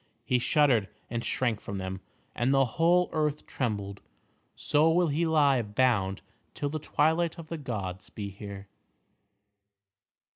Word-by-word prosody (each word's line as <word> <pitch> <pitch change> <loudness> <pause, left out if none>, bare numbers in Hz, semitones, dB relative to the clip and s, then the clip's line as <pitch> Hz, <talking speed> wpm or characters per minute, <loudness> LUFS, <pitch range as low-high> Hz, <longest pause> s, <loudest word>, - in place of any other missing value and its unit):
He 125 - +2
shuddered 125 - +3 0.2
and 120 -1 -2
shrank 120 -5 0
from 100 - -5
them, 95 0 -5 0.3
and 120 +2 +1
the 135 0 +4
whole 170 +8 +3
earth 150 -1 -1
trembled. 100 -5 -3 0.5
So 150 +2 +3
will 170 0 +3
he 160 +4 +1
lie 145 -5 +4
bound 105 -3 +1 0.3
till 145 - -2
the 155 +2 -3
Twilight 160 +3 +1
of 165 -1 -10
the 165 - -4
Gods 100 -8 -5
be 100 -2 -6
here. 100 0 -9
130 Hz, 140 wpm, -28 LUFS, 100-155 Hz, 0.5 s, the